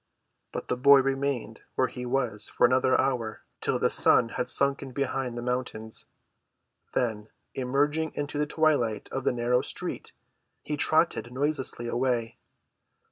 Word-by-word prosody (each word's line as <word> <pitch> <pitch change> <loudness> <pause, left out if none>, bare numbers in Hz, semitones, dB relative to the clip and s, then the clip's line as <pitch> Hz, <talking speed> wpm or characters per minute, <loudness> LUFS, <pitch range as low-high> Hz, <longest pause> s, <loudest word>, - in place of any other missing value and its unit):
But - - -5
the - - 0
boy 140 +2 +7
remained 135 -4 -2
where 130 - +3
he 125 0 -6
was 120 -5 -1
for - - +3
another 130 +1 +3
hour 125 -5 -1 0.2
till - - +1
the - - +2
sun 115 - +4
had 125 +1 -3
sunken 140 -1 +1
behind 130 -2 -2
the 120 - -4
mountains. 125 -3 -3 0.9
Then, 110 -3 -1 0.2
emerging 145 +5 0
into 145 0 -3
the 150 - +1
twilight 145 -9 +1
of 135 0 -3
the - - +3
narrow 125 +1 +1
street, - - -3 0.5
he 150 - -3
trotted 155 -4 +2
noiselessly 135 -3 -1
away. 120 -2 -1
130 Hz, 140 wpm, -27 LUFS, 120-140 Hz, 0.9 s, boy